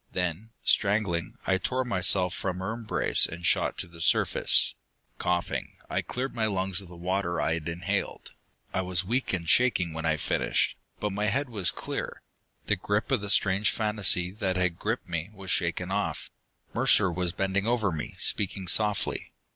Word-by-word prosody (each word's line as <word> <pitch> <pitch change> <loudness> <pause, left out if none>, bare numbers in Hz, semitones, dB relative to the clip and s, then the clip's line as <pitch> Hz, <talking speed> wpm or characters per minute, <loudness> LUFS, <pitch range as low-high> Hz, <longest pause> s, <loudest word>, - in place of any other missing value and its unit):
Then, 90 +4 -2
strangling, 100 -5 +1
I 95 0 +2
tore 130 +7 -1
myself 95 -4 +3
from 95 -1 -3
her 95 +4 -3
embrace 115 -1 +2
and 85 +1 -7
shot - - +2
to - - -3
the 85 -1 -13
surface. 80 - +3 0.5
Coughing, 90 -1 -1 0.2
I - - +1
cleared 130 +2 -4
my 110 -2 0
lungs 95 -1 +1
of 95 - -12
the 90 - -12
water 90 0 -1
I 80 - +1
had 85 0 -3
inhaled. 85 +1 -3 0.4
I 95 - +1
was 90 0 0
weak 125 +6 0
and 85 -3 -2
shaking 95 -9 +3
when 80 0 -3
I 80 -1 +2
finished, - - 0 0.2
but 105 -2 -2
my 105 +1 -1
head 130 +6 0
was 105 -6 +2
clear. - - -4 0.4
The - - +1
grip 105 +6 -1
of 130 -6 +2
the 100 - -5
strange 100 +1 +3
fantasy 105 -5 +1
that 95 -2 -1
had 90 -2 0
gripped 110 +1 -2
me 85 +1 -3
was 95 -1 -5
shaken 90 +1 0
off. 100 +1 -2 0.4
Mercer 90 - +3
was 90 0 -1
bending 95 +3 -1
over 115 -5 +1
me; 75 -2 -5
speaking 95 -2 +1
softly. 105 +2 +2
95 Hz, 175 wpm, -28 LUFS, 90-105 Hz, 0.5 s, myself